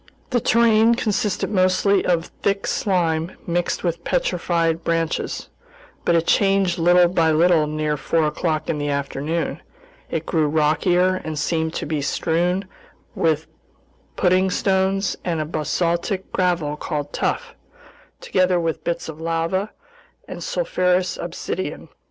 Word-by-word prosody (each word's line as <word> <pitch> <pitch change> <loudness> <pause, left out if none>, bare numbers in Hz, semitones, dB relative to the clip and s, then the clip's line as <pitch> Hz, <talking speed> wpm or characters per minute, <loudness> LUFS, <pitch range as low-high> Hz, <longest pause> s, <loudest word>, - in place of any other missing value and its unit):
The 245 - +3
terrain 230 0 +4
consisted 210 -2 -1
mostly 185 0 +3
of 170 -1 0
thick 200 0 0
slime 170 -3 0
mixed 175 0 -1
with 170 -1 -2
petrified 170 - 0
branches, 165 -1 -1 0.6
but 170 - +3
it 165 0 +2
changed 195 -3 +2
little 175 +1 +5
by 170 -2 +2
little 160 -1 +4
near 150 0 -1
four 160 +2 +1
o'clock 155 0 -1
in 150 - -1
the 145 0 -2
afternoon; 140 +3 -2 0.5
it 165 0 -3
grew 160 -3 +1
rockier 175 +5 +2
and 155 -1 -4
seemed 160 +1 -1
to - - -3
be 150 -1 -2
strewn 175 +6 0 0.5
with 160 -1 +1 0.7
pudding 185 +1 +3
stones 190 +1 +1
and 170 -3 -1
a 155 - -1
basaltic 170 +4 -1
gravel 175 -5 0
called 150 -2 -4
"tuff," - - -2 0.7
together 185 -1 +2
with 165 -2 -2
bits 170 - -2
of 160 0 -8
lava 165 +5 -1 0.6
and - - -7
sulfurous 185 - 0
obsidian. - - -5
170 Hz, 130 wpm, -22 LUFS, 160-185 Hz, 0.7 s, little